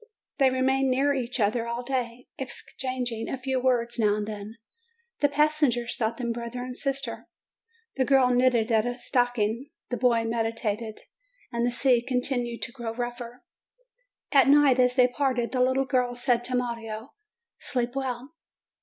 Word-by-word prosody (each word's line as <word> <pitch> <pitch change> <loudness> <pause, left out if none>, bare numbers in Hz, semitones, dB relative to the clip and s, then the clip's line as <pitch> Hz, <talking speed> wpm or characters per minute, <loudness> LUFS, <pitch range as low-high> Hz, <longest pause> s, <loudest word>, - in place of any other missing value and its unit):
They 270 -1 +6
remained 265 +1 +1
near 275 +3 +2
each 255 -1 -2
other 230 +2 +1
all 235 +1 -3
day, 250 -1 -3
exchanging 255 -3 -4
a - - -2
few 260 0 -1
words 240 -2 +1
now 210 -2 +3
and 210 0 -2
then. 210 +1 -7 0.6
The 290 - +3
passengers 290 -5 +2
thought 225 0 -1
them 235 -2 -2
brother 235 +1 -5
and 250 0 -6
sister. 275 -3 -4 0.7
The 260 - +2
girl 265 -2 +4
knitted 245 -2 +3
at 220 +1 +3
a 245 0 -3
stocking, 245 0 0 0.2
the 245 - -1
boy 235 -2 +3
medi 225 0 -1
tated, 220 -1 -4 0.5
the 235 +1 +1
sea 250 -1 +3
continued 245 -1 -1
to - - -3
grow 235 -2 -6
rougher. 240 0 -5 0.9
At 275 -2 +6
night, 280 -3 +6
as 250 0 +4
they 250 -1 +6
parted, 250 -2 -1
the 260 +1 +2
girl 250 -2 +1
said 245 -1 +1
to 255 - -2
Mario, 230 -1 -4 0.5
"Sleep 245 -2 -1
well." 265 +1 -4
245 Hz, 155 wpm, -27 LUFS, 235-260 Hz, 0.9 s, They